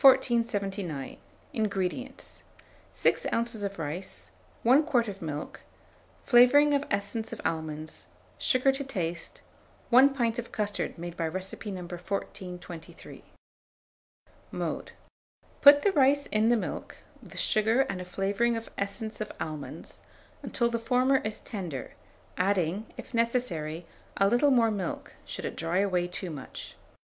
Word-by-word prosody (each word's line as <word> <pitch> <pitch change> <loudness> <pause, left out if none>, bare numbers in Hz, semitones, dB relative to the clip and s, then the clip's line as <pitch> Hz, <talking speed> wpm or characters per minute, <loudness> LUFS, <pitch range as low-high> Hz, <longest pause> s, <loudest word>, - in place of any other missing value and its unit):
1479. 205 - +3 0.4
INGREDIENTS. 215 +4 -3 0.5
6 - - +1
oz. 230 -2 0
of 200 -1 -3
rice, 165 +4 -5 0.3
1 255 +6 +6
quart 250 -7 +2
of 195 -1 -6
milk, 150 -2 -5 0.7
flavouring 280 +4 +7
of 285 0 +2
essence 200 +3 -2
of - - -6
almonds, 155 -1 -3 0.3
sugar 265 -1 +4
to 270 +1 -3
taste, 175 -10 -4 0.5
1 270 +3 +7
pint 235 -3 +1
of 235 - -6
custard 205 -1 -2
made 170 0 -6
by 165 - -1
recipe 190 +5 -5
No. 190 -2 -5
1423. 180 -1 -7 1.3
Mode. - - -3 0.7
Boil 285 0 +10
the 400 - +4
rice 285 -3 +4
in 215 +1 +2
the 240 - +5
milk, - - -5 0.2
with - - -7
sugar 220 +4 +3
and 195 -8 -2
a - - -6
flavouring 200 +6 0
of 225 - -7
essence 215 +2 -3
of 215 - -3
almonds, 155 -2 -6 0.4
until 235 - 0
the 235 0 -1
former 255 +3 +3
is 215 -4 -3
tender, 175 - -5 0.4
adding, 190 +2 +1
if - - -9
necessary, 230 -10 0 0.3
a 195 - +5
little 245 +7 +4
more 235 -4 +4
milk, 195 -5 -4
should - - -5
it - - -4
dry 165 +2 -1
away 185 -3 +2
too 180 0 -5
much. 140 -4 -8
205 Hz, 135 wpm, -29 LUFS, 180-240 Hz, 1.3 s, Boil